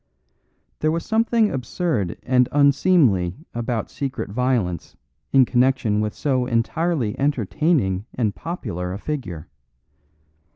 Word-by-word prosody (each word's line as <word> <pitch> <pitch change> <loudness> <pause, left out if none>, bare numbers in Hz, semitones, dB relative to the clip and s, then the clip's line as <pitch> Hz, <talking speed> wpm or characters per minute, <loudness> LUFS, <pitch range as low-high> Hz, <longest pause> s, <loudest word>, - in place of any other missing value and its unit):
There 155 - +1
was 165 +1 -2
something 225 -1 +2
absurd 125 - -2
and 125 -1 +3
unseemly 140 - +3 0.2
about 120 -1 -3
secret 135 -7 -4
violence 115 - -1 0.3
in 135 -2 +6
connection 125 -4 +2
with 105 -1 -2
so 130 -4 0
entirely 125 +1 0
entertaining 135 - +1
and 110 -5 0
popular 95 - -5
a - - -4
figure. 95 - -5
125 Hz, 110 wpm, -22 LUFS, 105-150 Hz, 0.3 s, in